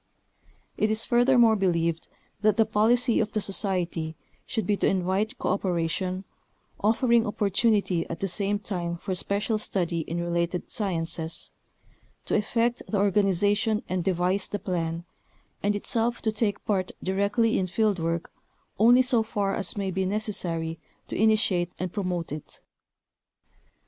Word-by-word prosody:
It 215 - +2
is 220 +1 +1
furthermore 240 -2 +5
believed 170 -4 0 0.3
that 215 -1 +3
the 225 - +5
policy 230 +3 +2
of 215 0 -1
the 215 - +1
Society 180 -5 -2 0.3
should 220 - -2
be 210 - +2
to - - +2
invite 195 +6 0
cooperation, 185 +1 -1 0.5
offering 230 +2 +3
opportunity 205 -3 +1
at 165 - -5
the 195 - -1
same 200 +2 -1
time 175 -4 -3
for 185 - -4
special 205 +4 -1
study 175 -5 -1
in 165 +2 -3
related 170 +1 -2
sciences; 165 -5 -3 0.7
to - - -3
effect 230 +3 +1
the 210 - -1
organization 205 +2 +2
and 185 -1 -1
devise 185 +2 0
the 205 - -2
plan, 170 -3 -3 0.6
and 205 +1 +1
itself 230 +3 +1
to 220 - +2
take 210 -1 -1
part 190 -4 0
directly 200 +4 +1
in 185 - 0
field 205 0 +1
work 165 +1 -2 0.5
only 240 +4 +6
so 250 -2 +3
far 205 -3 -1
as 195 - -2
may 195 -2 -1
be 190 +1 -1
necessary 170 -6 -2 0.3
to - - -4
initiate 195 -5 +2
and 180 -1 -4
promote 180 -6 -2
it. 150 0 -8
200 Hz, 140 wpm, -26 LUFS, 175-215 Hz, 0.7 s, only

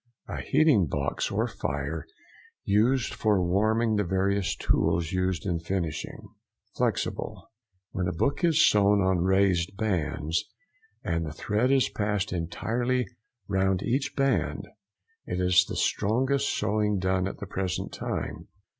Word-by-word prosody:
—A - - -4
heating 135 - +3
box 70 -1 -2
or - - 0
fire 75 +3 -4 0.6
used 115 +5 +2
for 105 -3 +2
warming 110 +5 +2
the 105 - +2
various 95 +1 0
tools 85 -1 +1
used 95 -2 -1
in 85 -3 0
finishing. 85 -2 -4 0.5
FLEXIBLE.—When 95 -4 -4
a - - 0
book 140 - -1
is 165 -3 +5
sewn 100 0 +4
on 95 -2 +2
raised 95 0 +2
bands, 85 -5 -1 0.6
and 85 0 -1
the 80 - -4
thread 105 - 0
is 135 -1 +4
passed 105 -3 -1
entirely 120 +9 -1 0.4
round 95 -1 +1
each 130 +4 -1
band. 135 0 0 0.6
It - - -2
is 90 -1 +4
the - - -6
strongest 130 +6 +1
sewing 105 -1 0
done 95 0 0
at - - -6
the - - -6
present 95 -1 -3
time. - - -4
95 Hz, 130 wpm, -27 LUFS, 90-110 Hz, 0.6 s, is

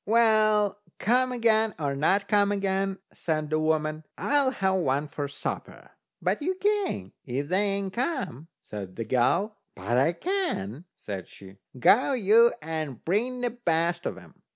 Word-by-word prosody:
"Well, 215 -2 +3 0.2
come 255 +4 +2
again, 225 -2 +2
or 140 -3 -1
not 195 +8 +2
come 205 -1 +3
again," 195 -1 0 0.2
said 155 -2 -2
the 155 - +2
woman, 155 0 0
"I'll 285 -2 +2
have 195 -7 0
one 140 0 0
for 145 0 -4
supper." 140 - -6 0.3
"But - - 0
you 370 +5 0
can't, 400 - -1
if 135 +4 -3
they 185 +3 +2
ain't 200 -1 -1
come," 245 - -3 0.2
said 95 -3 -7
the 115 - -4
girl. 195 - +1 0.2
"But 120 +1 0
I 160 +6 +3
can," 175 - -2
says 95 -3 -6
she. 95 0 -14 0.2
"Go 245 - +5
you, 230 0 +5
and 155 -6 -4
bring 245 +8 0
the 245 -1 0
best 170 -6 0
of - - -4
'em." 90 -4 -16
190 Hz, 155 wpm, -27 LUFS, 145-230 Hz, 0.3 s, Go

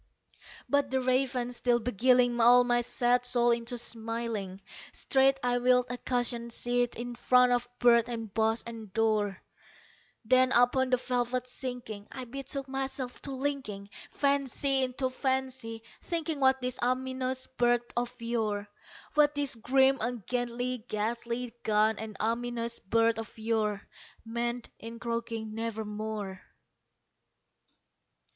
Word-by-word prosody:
'" - - -23 0.2
But 285 -1 +2
the 265 0 +1
Raven 255 -1 0
still 245 0 +2
beguiling 245 +1 +3
all 245 +2 +7
my 240 0 +2
sad 245 +1 +1
soul 240 -1 +3
into 235 +1 -1
smiling, 230 -4 -4 0.3
Straight 270 0 +2
I 245 0 +2
wheeled 250 0 +4
a 245 - -4
cushioned 240 -1 +1
seat 245 0 0
in 240 +1 -5
front 250 +1 +4
of 245 0 +1
bird 235 -1 +5
and 225 -4 -5
bust 225 +1 +1
and 225 -3 -8
door; 215 -3 +1 0.9
Then, 255 +2 +4
upon 250 +2 +4
the 255 - +3
velvet 250 0 -1
sinking, 245 -5 -6
I 260 -1 -6
betook 275 +2 -4
myself 265 -1 -4
to 280 - -2
linking 260 -8 -3 0.2
Fancy 275 -1 +1
unto 260 +1 -1
fancy, 260 -4 -2 0.2
thinking 325 -3 -3
what 265 -1 +4
this 250 0 -2
ominous 260 +1 -1
bird 240 -2 +1
of 245 +1 -2
yore 220 -3 -1 0.5
What 295 -1 +4
this 285 -2 0
grim, 265 +3 +3
ungainly, 245 +1 -2
gaunt, 225 -1 0
and 220 -2 -7
ominous 235 +1 -2
bird 230 +2 +2
of 225 0 -8
yore 220 -2 -1 0.4
Meant 235 +1 -3
in 230 +1 -8
croaking 230 -2 -4
"Nevermore." 215 -3 -4
240 Hz, 125 wpm, -30 LUFS, 225-255 Hz, 0.9 s, all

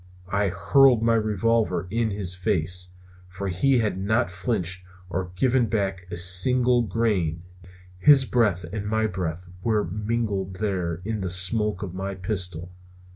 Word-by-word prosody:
I 100 +1 +1
hurled 115 +7 +4
my 115 0 +3
revolver 110 -4 +1
in 115 0 0
his 100 -3 -3
face, 90 -2 -1 0.4
for 95 +2 -5
he 130 +10 +2
had 110 -5 -1
not 110 +2 0
flinched 90 -1 -2 0.3
or 90 +1 -3
given 125 +3 +2
back 95 -4 -2
a 85 - -5
single 120 +8 +4
grain. 95 -7 -1 0.6
His 140 +3 +6
breath 105 -9 +1
and 105 -1 -4
my 110 +1 +1
breath 90 -3 -4
were 110 -2 +1
mingled 105 0 -2
there 90 -4 -2
in 110 -1 -3
the 95 - -2
smoke 95 +3 0
of 90 -3 -6
my 95 +1 -4
pistol. 90 -3 -4
100 Hz, 145 wpm, -24 LUFS, 90-115 Hz, 0.6 s, His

